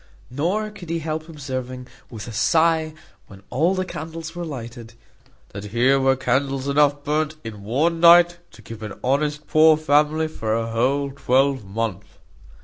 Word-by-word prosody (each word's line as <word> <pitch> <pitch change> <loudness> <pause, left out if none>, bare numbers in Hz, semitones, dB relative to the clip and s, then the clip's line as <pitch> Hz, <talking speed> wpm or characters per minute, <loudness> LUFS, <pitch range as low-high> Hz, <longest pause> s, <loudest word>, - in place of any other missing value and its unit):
Nor 185 +11 -1
could 185 -5 -11
he 165 - -1
help 160 0 -4
observing, 130 -4 -6 0.2
with 110 -2 -8
a - - -6
sigh, 160 +5 +2 0.3
when 95 0 -15
all 165 +9 +2
the 185 0 -1
candles 165 0 -7
were 175 - -4
lighted, 120 -6 -8 0.5
"That 100 0 -8
here 120 +6 +2
were 135 0 +3
candles 135 +1 -1
enough 145 0 +2
burnt 155 +1 -1
in 110 -3 -8
one 150 +11 0
night, 175 0 +6
to - - -16
keep 115 -1 -10
an 105 -2 -8
honest 150 +3 0
poor 155 0 +5
family 155 +1 +2
for 110 -8 -3
a 115 0 -2
whole 135 +5 0
twelvemonth." 115 -7 -1
140 Hz, 155 wpm, -22 LUFS, 120-160 Hz, 0.5 s, night